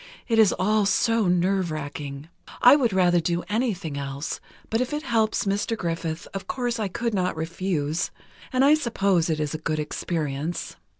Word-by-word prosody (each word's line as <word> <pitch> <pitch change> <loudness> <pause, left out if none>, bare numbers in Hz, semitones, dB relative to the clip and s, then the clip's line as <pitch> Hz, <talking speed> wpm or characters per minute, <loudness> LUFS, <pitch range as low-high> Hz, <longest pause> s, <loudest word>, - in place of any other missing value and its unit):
It 225 -2 +2
is 215 -3 +6
all 210 +1 +2
so 225 -1 +2
nerve 180 +1 +2
racking. 145 -1 -6 0.3
I 245 - +8
would 255 -6 +2
rather 180 -2 +4
do 170 +1 -1
anything 205 - -1
else, 140 +2 -4 0.3
but 225 +2 +2
if 255 +3 -2
it 300 +1 -2
helps 225 -5 +1
Mr. 205 +3 0
Griffith, 165 -2 -3
of 195 - -5
course 245 -2 -2
I 215 - 0
could 230 +4 -2
not 180 -4 0
refuse, 160 -1 -1 0.4
and 260 +1 +3
I 290 - +7
suppose 200 - +1
it 155 -1 0
is 150 -1 -2
a 155 - -3
good 155 0 -2
experience. 150 0 -3
185 Hz, 175 wpm, -25 LUFS, 160-225 Hz, 0.4 s, I